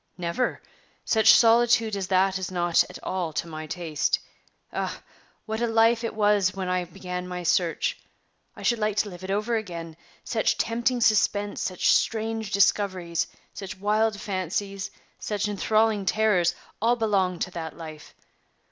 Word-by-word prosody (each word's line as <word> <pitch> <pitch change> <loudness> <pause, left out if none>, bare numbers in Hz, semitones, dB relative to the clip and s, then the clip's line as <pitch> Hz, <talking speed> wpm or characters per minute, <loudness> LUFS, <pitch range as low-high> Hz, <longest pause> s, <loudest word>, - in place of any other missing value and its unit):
"Never! 175 +8 -2 0.4
such 220 -1 +6
solitude 230 -2 +4
as 195 -2 -3
that 190 0 +2
is 185 - -4
not 175 -2 +2
at - - -9
all 180 -3 -2
to - - -2
my 155 -1 -7
taste." 160 -2 -1 0.6
"Ah! - - -3 0.4
what 220 +1 -3
a 235 - +2
life 225 +1 +3
it 230 - -3
was 205 -3 +2
when 190 -1 -3
I 180 0 0
began 180 0 -6
my 180 -1 -5
search. 170 0 +1 0.6
I - - -10
should 235 -2 +2
like 210 -1 0
to 210 - +1
live 180 -1 -11
it 185 - -6
over 210 +4 0
again. 170 -6 -6 0.3
Such 220 -2 0
tempting 240 +2 0
suspense, 205 -2 +2
such 185 -2 +1
strange 225 -1 0
discoveries, 185 -4 +1 0.3
such 190 -1 -7
wild 210 +2 +1
fancies, 195 +1 -3 0.3
such 210 -1 -2
inthralling 215 0 +1
terrors, 185 -6 +2 0.3
all 235 +2 +3
belonged 195 -6 0
to 185 - -6
that 165 -3 -6
life. 155 -2 -10
200 Hz, 155 wpm, -26 LUFS, 180-220 Hz, 0.6 s, such